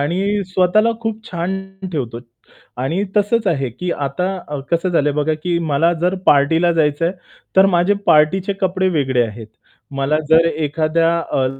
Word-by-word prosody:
आणि 195 Hz, +7 st, 0 dB
स्वतःला 190 Hz, +5 st, +3 dB
खूप 225 Hz, -1 st, -4 dB
छान 180 Hz, +2 st, -2 dB, 0.3 s
ठेवतो 120 Hz, -6 st, -3 dB, 0.6 s
आणि 170 Hz, +9 st, -1 dB
तसंच 210 Hz, +1 st, +1 dB
आहे, 135 Hz, -7 st, 0 dB
की 175 Hz, +10 st, -5 dB, 0.2 s
आता 180 Hz, +8 st, -2 dB
अ, 145 Hz, -2 st, -4 dB
कसं 170 Hz, +2 st, +1 dB
झालंय 150 Hz, -4 st, +1 dB
बघा 150 Hz, +2 st, 0 dB
की 175 Hz, -1 st, 0 dB
मला 165 Hz, +5 st, +3 dB
जर 180 Hz, +2 st, +2 dB
पार्टीला 160 Hz, +5 st, +4 dB
जायचं 155 Hz, -1 st, +1 dB
आहे, 175 Hz, -, -2 dB, 0.4 s
तर 190 Hz, +1 st, +7 dB
माझे 175 Hz, +4 st, +3 dB
पार्टीचे 180 Hz, +6 st, +3 dB
कपडे 190 Hz, 0 st, +1 dB
वेगळे 130 Hz, -4 st, +1 dB
आहेत. 110 Hz, +1 st, -9 dB, 0.5 s
मला 140 Hz, +3 st, 0 dB
जर 160 Hz, +1 st, +5 dB
एखाद्या 160 Hz, +1 st, 0 dB, 0.2 s
अ, 130 Hz, -, +1 dB
165 Hz, 155 wpm, -18 LUFS, 145-190 Hz, 0.6 s, तर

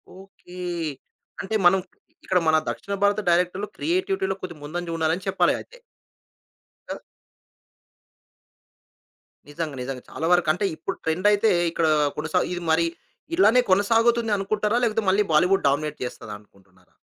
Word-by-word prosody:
Okay. 190 Hz, -1 st, -16 dB, 0.9 s
అంటే 220 Hz, +4 st, -3 dB
మనం 190 Hz, +2 st, +6 dB, 0.5 s
ఇక్కడ 185 Hz, -, +2 dB
మన 160 Hz, 0 st, +5 dB
దక్షిణ 200 Hz, -, -5 dB
భారత 205 Hz, +1 st, +3 dB
డైరెక్టర్లు 180 Hz, +4 st, +1 dB
క్రియేటివిటీ‌లో 380 Hz, -, -1 dB
కొద్దిగా 170 Hz, -5 st, -8 dB
ముందంజ 175 Hz, +4 st, -5 dB
ఉన్నారని 160 Hz, 0 st, +1 dB
అని 190 Hz, -, -11 dB
చెప్పాలి -, -, +2 dB
అయితే. -, -, -13 dB, 1.2 s
ఆ! -, -, -7 dB, 2.5 s
నిజంగా. 150 Hz, -1 st, -5 dB
నిజంగా. 125 Hz, 0 st, -6 dB
చాలా 160 Hz, -, -3 dB
వరకు 175 Hz, -3 st, +2 dB
అంటే 180 Hz, +5 st, -2 dB
ఇప్పుడు 165 Hz, +5 st, -5 dB
ట్రెండయితే 205 Hz, +6 st, +2 dB, 0.2 s
ఇక్కడ 165 Hz, -1 st, 0 dB, 0.3 s
కొనసాగు 155 Hz, +4 st, 0 dB
ఇది 175 Hz, 0 st, -5 dB
మరి 170 Hz, +1 st, +3 dB, 0.5 s
ఇలానే 250 Hz, -9 st, +5 dB
కొనసాగుతుంది 230 Hz, +3 st, +3 dB
అనుకుంటారా? 210 Hz, +3 st, 0 dB
లేకపోతే 225 Hz, -1 st, +1 dB
మళ్ళీ 205 Hz, +2 st, +3 dB
బాలీవుడ్ 180 Hz, +5 st, +3 dB
డామినేట్ 150 Hz, +1 st, -2 dB
చేస్తదనుకుంటున్నారా? 100 Hz, -5 st, -11 dB
180 Hz, 125 wpm, -24 LUFS, 160-210 Hz, 2.5 s, మనం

